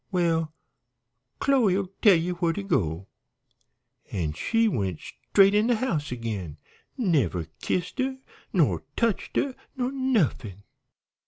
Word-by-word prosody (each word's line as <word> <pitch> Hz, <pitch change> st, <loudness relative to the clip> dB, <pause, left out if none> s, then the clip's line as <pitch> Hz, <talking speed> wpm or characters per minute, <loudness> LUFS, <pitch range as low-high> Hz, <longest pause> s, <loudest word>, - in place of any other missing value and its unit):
'Well, 165 Hz, -4 st, +1 dB, 0.9 s
Chloe'll 200 Hz, -9 st, +2 dB
tell 205 Hz, -4 st, +7 dB
ye 170 Hz, +2 st, 0 dB
where 170 Hz, -1 st, 0 dB
to 205 Hz, -, -4 dB
go,' 90 Hz, -, -1 dB, 1.0 s
an' 80 Hz, -6 st, -2 dB
she 225 Hz, -, +1 dB
went 95 Hz, -, -1 dB
straight 195 Hz, 0 st, +2 dB
in 210 Hz, +2 st, +3 dB
de 245 Hz, -, +3 dB
house 170 Hz, -, -2 dB
agin. 105 Hz, -10 st, -4 dB, 0.4 s
Never 150 Hz, -, +1 dB, 0.2 s
kissed 180 Hz, +8 st, -2 dB
her, 260 Hz, 0 st, 0 dB, 0.3 s
nor -, -, +2 dB
touched 230 Hz, -4 st, -1 dB
her, 275 Hz, -, +1 dB, 0.2 s
nor 250 Hz, 0 st, -1 dB
nuffin! 200 Hz, -, 0 dB
180 Hz, 120 wpm, -26 LUFS, -, 1.0 s, tell